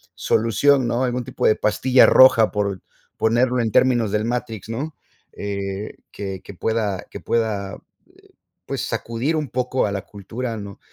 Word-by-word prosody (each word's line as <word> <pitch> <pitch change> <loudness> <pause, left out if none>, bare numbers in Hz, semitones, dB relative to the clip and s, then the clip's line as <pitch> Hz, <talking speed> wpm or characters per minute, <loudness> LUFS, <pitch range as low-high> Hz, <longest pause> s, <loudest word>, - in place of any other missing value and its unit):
solución, 120 +4 +2
¿no? 120 +2 0
Algún 125 -1 -1
tipo - - -3
de 110 - +5
pastilla 125 +4 +4
roja 115 -4 +6
por, 100 -3 -2 0.4
ponerlo 120 +3 +2
en 110 -2 -1
términos 120 -4 +3
del 105 +1 0
Matrix, 115 -3 -4
¿no? 140 +7 -4 0.4
Eh, 100 0 -4 0.2
que 95 -2 -6
que - - -11
pueda 105 -2 -1
que - - -7
pueda, 105 -4 -1 0.3
eh, - - -24 0.4
pues - - -3
sacudir 120 +8 -2
un 150 -3 -2
poco 125 0 0
a 100 - -2
la 100 -1 -3
cultura, 115 +4 -6
¿no? 100 -2 -9
115 Hz, 160 wpm, -22 LUFS, 100-125 Hz, 0.4 s, roja